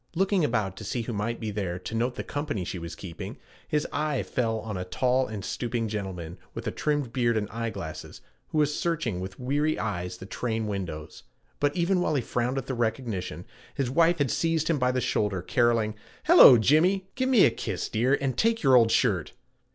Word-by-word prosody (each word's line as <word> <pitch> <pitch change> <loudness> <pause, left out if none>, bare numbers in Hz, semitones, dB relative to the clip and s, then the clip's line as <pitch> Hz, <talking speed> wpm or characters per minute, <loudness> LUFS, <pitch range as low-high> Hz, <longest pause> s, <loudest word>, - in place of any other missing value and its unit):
Looking 195 0 +2
about 110 -8 0
to - - -7
see 115 +3 -2
who 120 - -4
might 110 +3 -2
be 110 -2 -3
there 95 -4 -3
to 90 - -7
note 120 +2 0
the - - -4
company 145 - -3
she 90 - -4
was 85 0 -7
keeping, 85 -4 -8 0.3
his 150 -1 0
eye 150 -3 0
fell 115 -3 -1
on 110 -2 -5
a 90 - -3
tall 125 +7 +1
and 105 -3 -6
stooping 120 -2 -2
gentleman 95 -5 -5 0.2
with - - -6
a - - -1
trimmed 145 -6 -1
beard 120 -3 +2
and 105 -1 -1
eyeglasses, 115 -8 -5 0.3
who - - -4
was 150 -1 +3
searching 155 - -1
with 95 0 -7
weary 145 +5 0
eyes 90 -4 -3
the 95 - -9
train 110 +1 -2
windows; 90 -7 -5 0.4
but 145 0 +1
even 180 +1 +2
while 155 - +1
he 135 - +2
frowned 125 +3 -1
at 135 - -2
the 135 - -3
recognition, 115 -5 -2 0.3
his 130 -3 -1
wife 170 +4 +4
had 145 -5 +1
seized 165 -1 +1
him 155 - +1
by 125 0 +2
the 130 0 -1
shoulder, 100 -5 0
caroling, 115 0 +2 0.3
'Hello, 315 - +9
Jimmy. 170 - +3
Give 260 0 -1
me 245 -7 +6
a - - +4
kiss, - - -4
dear, 125 +6 +2
and 135 -2 -1
take 225 -2 +1
your 135 -2 +6
old 115 -2 +6
shirt.' 100 - +1
120 Hz, 205 wpm, -27 LUFS, 105-145 Hz, 0.4 s, Hello